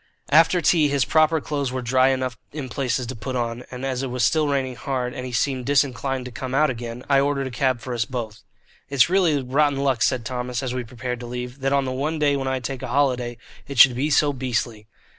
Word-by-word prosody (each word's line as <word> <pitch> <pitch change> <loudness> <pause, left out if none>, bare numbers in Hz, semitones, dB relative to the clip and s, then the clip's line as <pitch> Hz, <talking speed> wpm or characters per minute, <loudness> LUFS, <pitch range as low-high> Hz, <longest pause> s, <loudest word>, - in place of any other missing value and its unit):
After 165 +4 +5
tea 160 -1 +4
his 140 -2 +1
proper 155 0 +3
clothes 140 -3 -3
were 130 -1 -3
dry 130 +2 +3
enough 130 -2 0 0.2
in 140 -3 -6
places 125 -1 -1
to 130 - -6
put 130 +3 -5
on, 120 0 -2
and 125 +1 -6
as 130 -1 -2
it 135 - -3
was 125 0 -1
still 155 -2 +3
raining 135 -3 -1
hard, 125 -1 -3
and 125 0 -5
he - - -7
seemed 130 0 -1
disinclined 135 -2 0
to 125 - -7
come 130 +2 -5
out 150 0 +3
again, 120 0 -7
I 140 -1 +4
ordered 140 0 0
a 130 - -5
cab 130 0 0
for 125 +3 -5
us 120 -1 0
both. 110 -4 -6 0.5
"It's 140 +3 +3
really 170 -8 +3
rotten 140 +2 +1
luck," 135 -4 0
said 125 -1 +1
Thomas, 125 0 -3
as 125 -1 -2
we 125 -1 -3
prepared 125 +1 -5
to 120 - -7
leave, 125 +2 -6
"that 135 0 0
on 140 -1 +2
the 130 - -2
one 145 +5 -2
day 145 -2 +2
when 135 -1 -2
I 130 0 0
take 130 +1 -5
a 130 - -4
holiday, 125 -2 0 0.3
it 140 -1 -7
should 125 +2 +8
be 140 +5 0
so 145 -1 +3
beastly." 120 -4 -3
130 Hz, 240 wpm, -23 LUFS, 125-140 Hz, 0.5 s, should